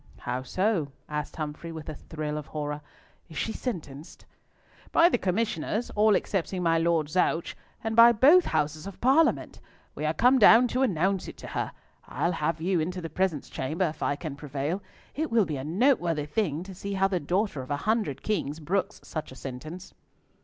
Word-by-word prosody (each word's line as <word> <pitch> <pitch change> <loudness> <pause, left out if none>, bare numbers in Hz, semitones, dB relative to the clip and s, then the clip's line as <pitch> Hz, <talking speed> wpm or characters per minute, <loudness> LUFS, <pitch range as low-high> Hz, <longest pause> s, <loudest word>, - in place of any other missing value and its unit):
"How 125 +1 -2
so?" 180 - 0 0.2
asked 150 -1 -4
Humfrey, 155 +2 -5
with 160 -2 -8
a 155 - -4
thrill 150 0 -5
of 150 - -9
horror, 150 -1 -4 0.5
"is 160 - -9
she 220 - -1
sentenced?" 155 - -6 0.7
"By 335 +1 +6
the 245 - +1
Commissioners, 205 +2 -1
all 210 0 +4
excepting 185 -1 -1
my 165 -1 +3
Lord 165 -2 +2
Zouch, 165 0 0 0.3
and 225 0 -2
by 230 +1 +9
both 285 +11 +6
houses 155 +3 -1
of 200 - -9
Parliament! 280 +6 +2 0.3
We 155 - -4
are 155 - +1
come 255 +2 +5
down 230 +3 +8
to 255 - 0
announce 190 -4 +1
it - - -9
to - - -9
her. - - -2 0.4
I'll 170 - 0
have 160 -1 -1
you 175 +2 +1
into 180 +4 -2
the 165 -3 -6
presence 175 -4 -1
chamber 155 +8 -2
if 155 - -10
I 145 - +1
can 150 -1 -6
prevail. 145 +5 -3 0.3
It 315 +2 -2
will 230 -3 +3
be 155 -3 -3
a 130 - -5
noteworthy 170 - +2
thing 160 -1 -1
to 190 0 -9
see 200 +2 -5
how 195 0 +3
the 190 -2 -1
daughter 175 0 -1
of 130 - -10
a 145 - 0
hundred 215 - 0
kings 160 -8 -1
brooks 185 +5 -2
such 155 -4 -6
a - - -10
sentence." 155 +8 -8
170 Hz, 190 wpm, -27 LUFS, 150-210 Hz, 0.7 s, by